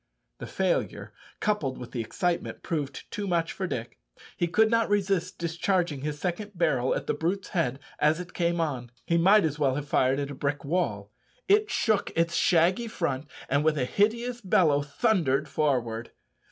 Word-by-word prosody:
The - - -6
failure, - - -1 0.3
coupled 160 - 0
with 125 - -9
the 120 - -2
excitement, 175 +9 -2
proved 145 -5 -3
too 205 -3 -3
much 170 -2 0
for 190 - -3
Dick; 120 -7 -5 0.4
he 175 - 0
could 220 +6 +3
not 230 -1 +2
resist 195 -3 0
discharging 170 -2 0
his 150 +1 -3
second 195 +6 -3
barrel 150 -7 +1
at - - -3
the - - 0
brute's 185 +4 -2
head 150 -8 0 0.2
as 150 +2 +3
it 180 0 -8
came 170 -1 0
on. 130 -7 -2 0.2
He 170 0 +2
might 195 +2 +6
as 155 0 -2
well 135 -3 +2
have 145 0 -4
fired 130 -1 +2
at 140 0 -3
a - - -5
brick 145 +1 -2
wall. 115 - -1 0.4
It 420 +2 +4
shook 215 -3 +1
its 170 0 +2
shaggy 180 +9 +3
front, 150 -9 -2 0.2
and 140 +2 +1
with 155 -1 +2
a 130 - +1
hideous 235 - 0
bellow 165 -7 +3
thundered 150 - +1
forward. 120 -6 -1
165 Hz, 180 wpm, -27 LUFS, 140-195 Hz, 0.4 s, might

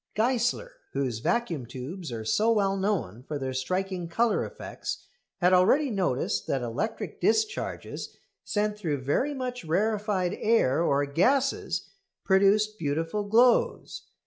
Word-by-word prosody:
Geissler, 250 - +1 0.2
whose 130 -5 -1
vacuum 170 - -1
tubes 135 +7 -7
are 110 -2 -5
so 215 - +2
well 200 -3 +2
known 190 - -1
for 145 +3 -5
their 130 -1 -3
striking 185 +6 -2
colour 230 +7 +1
effects, - - -6 0.4
had 180 +1 +4
already 245 +10 +4
noticed 180 - -1
that 135 -2 -1
electric 120 - -3
discharges 435 -1 -1 0.3
sent 210 0 -1
through 150 -8 -2
very 265 - 0
much 250 -3 -4
rarefied 200 +1 0
air 215 - +3
or 145 -3 +2
gases 255 - +1 0.3
produced 210 +2 +3
beautiful 165 +7 -1
glows. 235 +4 +2
195 Hz, 125 wpm, -27 LUFS, 145-225 Hz, 0.4 s, had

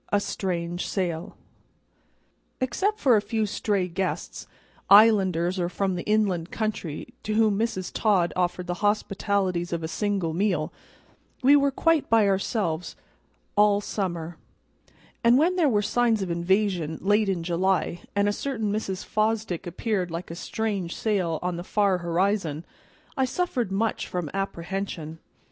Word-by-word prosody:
A 205 - +4
Strange 175 -3 -3
Sail 175 -4 -3 1.2
EXCEPT 380 - 0
FOR 255 - +5
a - - +1
few 220 0 -1
stray 200 -2 -1
guests, 185 +2 -4 0.4
islanders 190 -4 +5
or 175 -1 0
from 190 +1 -1
the 175 - -3
inland 200 -5 +1
country, 210 -9 -4
to 215 - -2
whom 215 -2 +3
Mrs. 190 -5 -2
Todd 195 -6 +2
offered 180 0 -1
the 175 - -2
hospitalities 200 -3 0
of 170 -1 -2
a - - -1
single 195 -2 -1
meal, 175 -3 0 0.7
we 280 +3 +7
were 280 -1 +4
quite 320 +2 +1
by 225 -2 +5
ourselves 190 -4 -1 0.6
all 205 -1 +5
summer; 175 -5 -4 0.9
and 235 +2 +6
when 340 +6 +3
there 335 -6 +3
were 210 -4 +2
signs 225 0 +2
of 180 - -3
invasion, 175 -2 0
late 205 +1 +2
in 180 -3 -1
July, 175 0 0
and 200 0 +2
a 205 - +1
certain 225 -5 -2
Mrs. 195 -3 -3
Fosdick 215 -4 -1
appeared 185 +1 -2
like 165 +1 -6
a - - -6
strange 195 -1 -3
sail 185 -7 0
on 180 -1 -2
the 175 - -5
far 195 -1 +1
horizon, 175 -2 0 0.5
I 265 -2 +2
suffered 255 - -1
much 220 +3 -1
from 175 -5 -4
apprehension. 180 -4 -4
195 Hz, 145 wpm, -26 LUFS, 175-215 Hz, 1.2 s, we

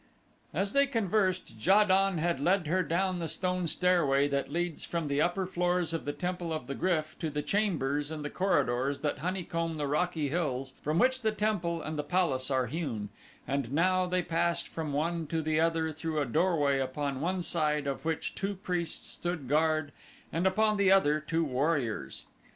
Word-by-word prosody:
As 195 +5 -1
they 280 0 +4
conversed 200 -6 0
Ja 195 +5 +6
don 195 -1 +3
had 170 -2 0
led 180 +4 +2
her 185 +5 +1
down 180 +1 0
the 165 - -2
stone 180 0 -1
stairway 150 -6 +3
that 140 0 -1
leads 175 0 -2
from 170 -3 -2
the 140 +1 +1
upper 175 +3 +1
floors 175 -2 0
of 165 - -3
the 145 - -1
Temple 175 +3 -3
of 155 -6 -2
the 140 - -4
Gryf 155 -2 -1
to 160 - -2
the 150 0 -3
chambers 150 -8 0
and 155 -2 -5
the 145 - -4
corridors 140 -7 +1
that 150 - -1
honeycomb 165 -1 -2
the 150 - -1
rocky 150 +1 0
hills 135 -5 -2
from 155 +2 0
which 260 +5 +3
the 220 -2 +2
temple 190 -6 -1
and 155 -1 -4
the - - 0
palace 145 -9 0
are 130 -2 +1
hewn 125 -7 -3 0.4
and 135 -2 -1
now 185 +4 +2
they 180 0 0
passed 170 +1 0
from 160 -2 -4
one 165 +3 -1
to 165 +2 -1
the 155 0 0
other 165 -1 +1
through 160 +1 -4
a 145 - +1
doorway 145 0 +2
upon 135 +1 -2
one 180 +2 -1
side 150 -3 0
of 140 -1 -3
which 160 -1 -2
two 195 +1 -3
priests 180 -4 -2
stood 175 -6 -4
guard 155 +1 +2 0.4
and 170 +3 +2
upon 215 +2 +2
the 200 -1 +4
other 155 -6 +4
two 165 +2 -1
warriors. 140 -4 -1
165 Hz, 190 wpm, -30 LUFS, 145-180 Hz, 0.4 s, Ja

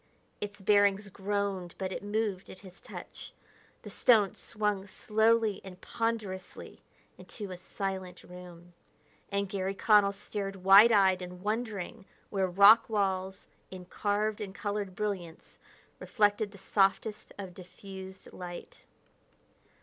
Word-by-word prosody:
Its 205 0 -6
bearings 200 0 +3
groaned, 195 -2 -3
but 190 -1 -3
it - - -4
moved 205 -2 -2
at - - -10
his 185 0 -14
touch. - - -10 0.5
The - - -9
stone 215 -6 +4
swung 210 -2 -3
slowly 220 0 +1
and 185 -1 -11
ponderously 220 -5 -4 0.4
into 205 -4 -8
a 180 - -6
silent 190 -1 -5
room, 175 -1 -13 0.6
and 200 0 0
Garry 195 0 -3
Connell 205 -1 +4
stared 200 -1 -5
wide 195 +4 +7
eyed 190 -3 +4
and 180 0 -9
wondering 215 -1 -3 0.3
where 195 -2 +1
rock 200 +6 +7
walls, 190 -3 -1 0.2
in 185 -1 -9
carved 210 +3 -1
and 195 -2 -6
colored 205 -2 -3
brilliance 185 -6 -5 0.4
reflected 205 -1 +1
the 200 - -14
softest 200 +2 0
of 190 -3 -7
diffused 190 +1 -11
light. 175 -1 -9
200 Hz, 125 wpm, -30 LUFS, 185-210 Hz, 0.6 s, wide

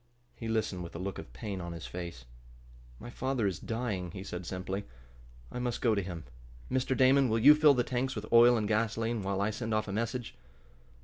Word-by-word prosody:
He 115 - -6
listened 110 -5 -1
with 85 -1 -8
a - - -3
look 95 +2 -4
of - - -10
pain 100 -5 -5
on 85 0 -5
his 85 -1 -7
face. 85 -8 -7 0.7
"My 120 - -9
father 130 -3 -1
is 95 -2 -1
dying," 110 -6 -3
he 95 +3 -7
said 90 -3 -6
simply. 95 +2 -4 0.7
"I - - -4
must 125 -1 -2
go 115 -3 +3
to 100 - +1
him. 90 -3 -6 0.5
Mr. 130 0 +1
Damon, 130 0 +5
will 110 - +2
you 135 +7 +9
fill 150 -2 +6
the 125 - +2
tanks 130 +2 -2
with 105 -1 -4
oil 120 +1 +8
and 105 -2 -1
gasoline, 115 +1 0
while 100 0 -1
I 105 +2 +1
send 110 0 -2
off 110 - 0
a - - -4
message?" 115 +2 -2
110 Hz, 210 wpm, -31 LUFS, 95-120 Hz, 0.7 s, you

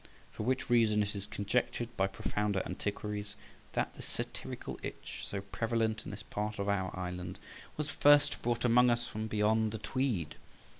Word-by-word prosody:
For - - -6
which 130 +4 0
reason 110 -4 +4
it 105 0 -3
is 100 0 -4
conjectured 120 +3 -1
by 95 - +3
profounder 100 0 -1
antiquaries 105 +2 -3 0.4
that - - 0
the - - -10
satirical - - -5
itch, - - -6
so 100 - -3
prevalent 110 +1 0
in - - -5
this - - -7
part 105 +1 -3
of 100 -1 -1
our 95 -2 +1
island, 90 -1 -4 0.4
was 150 -1 -1
first 145 -1 +5
brought 120 0 0
among 125 +1 +6
us 120 0 +1
from 110 -2 -3
beyond 110 0 +2
the 110 - -3
Tweed. 110 - -1
105 Hz, 165 wpm, -33 LUFS, 100-120 Hz, 0.4 s, among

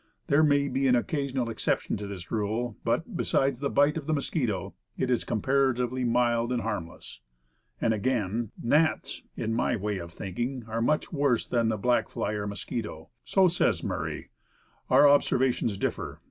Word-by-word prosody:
There 140 +2 +4
may 145 -2 +3
be 135 0 0
an 125 - +5
occasional 135 -1 -1
exception 115 - -1
to 100 0 -6
this 95 -4 -8
rule; 110 +2 -1
but - - -1
beside 135 -2 +1
the 140 +2 -2
bite 145 +2 +3
of 155 -2 -6
the 155 - +2
mosquito, 110 - -2 0.2
it 130 - 0
is 125 - +1
comparatively 130 +1 +1
mild 120 0 +2
and 120 -2 0
harmless." 85 - -5 0.6
And 115 - +2
again: 110 -1 -1
'Gnats 155 +6 +1 0.2
in 110 0 -1
my 120 +1 +1
way 105 -2 -2
of 85 -1 -8
thinking, 120 +8 -4
are 115 +1 -2
much 150 +8 0
worse 140 -5 +1
than 115 -2 +1
the 110 - 0
black 120 +4 +1
fly 105 - -2
or 105 -1 -3
mosquito." 100 -5 -5
So 190 -1 +4
says 175 0 +1
Murray. - - -4 0.6
Our 145 - +7
observations 130 -6 +2
differ. - - -3
120 Hz, 165 wpm, -28 LUFS, 105-140 Hz, 0.6 s, Our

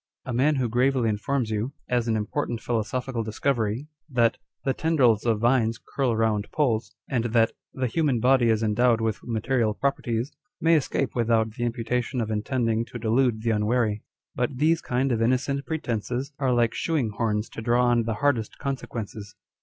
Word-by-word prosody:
A 130 - -4
man 140 +5 +3
who 130 -3 0
gravely 125 0 +2
informs 110 +3 -1
you, 110 +6 -2
as 120 -1 0
an 115 - +1
important 115 +3 -2
philo 115 -1 0
sophical 125 +1 -3
discovery, 110 +2 -1 0.2
that 120 -4 +2
" - - -41
the 135 - +2
tendrils 130 -9 +2
of 110 -2 +2
vines 115 -1 +2
curl 130 -3 -1
round 110 -2 0
poles," 125 -7 0
and 120 -3 -1
that 115 -1 +3
" - - -58
the 130 - -1
human 140 -1 +1
body 125 0 +4
is 110 0 +2
endowed 115 +2 +3
with 110 -2 -1
material 115 -1 0
properties," 120 -2 -1 0.3
may 165 +1 +4
escape 140 -3 +1
without 115 -2 +2
the 120 +2 -3
imputation 120 +2 -2
of 110 -2 -2
intend 115 +3 -1
ing 115 0 +1
to 120 - -8
delude 115 0 +1
the 115 - +2
unwary. 105 0 +1 0.3
But 125 +1 -2
these 160 +4 +3
kind 130 +2 0
of 115 -2 0
innocent 130 +4 0
pre 160 - -1
tences 125 +3 -3
are 135 -2 +1
like 120 -2 +2
shoeing 145 -10 0
horns 105 0 -1
to - - -7
draw 120 +2 +3
on 120 -1 +3
the 115 -1 -1
hardest 120 -3 0
consequences. 110 -6 -5
120 Hz, 185 wpm, -25 LUFS, 110-130 Hz, 0.3 s, body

